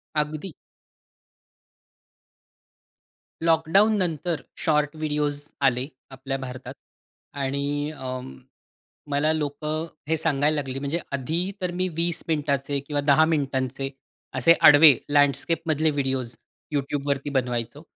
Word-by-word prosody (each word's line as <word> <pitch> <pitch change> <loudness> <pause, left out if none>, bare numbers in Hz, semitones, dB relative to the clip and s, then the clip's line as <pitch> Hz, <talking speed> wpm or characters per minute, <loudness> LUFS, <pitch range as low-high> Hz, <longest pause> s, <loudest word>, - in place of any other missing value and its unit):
अगदी. 150 +3 -2 2.9
लॉकडाउन 180 +6 +4
नंतर 170 -3 -1 0.2
short 150 -1 +1
videos 150 -2 -1 0.2
आले, 130 0 +2 0.2
आपल्या 135 +1 -4
भारतात 130 -1 -7 0.7
आणि 140 +2 -1
अ, 130 -4 -5 0.9
मला 145 +2 +2
लोकं 155 +1 -2 0.2
हे 160 - +2
सांगायला 150 -1 +1
लागली 135 -3 -3
म्हणजे 140 +4 -2
आधी 160 +8 -1
तर 180 -1 -1
मी 185 - +1
20 170 0 0
मिनिटाचे 140 -2 0 0.3
किंवा 150 +2 +6
मिनिटांचे 135 -3 -1 0.4
असे 130 +6 +6
आडवे 145 -3 +9
लँडस्केपमधले 155 +2 +2
व्हिडिओज 130 -4 -2 0.4
YouTubeवरती 140 0 -1
बनवायचो 125 0 -2
145 Hz, 95 wpm, -25 LUFS, 135-155 Hz, 2.9 s, आडवे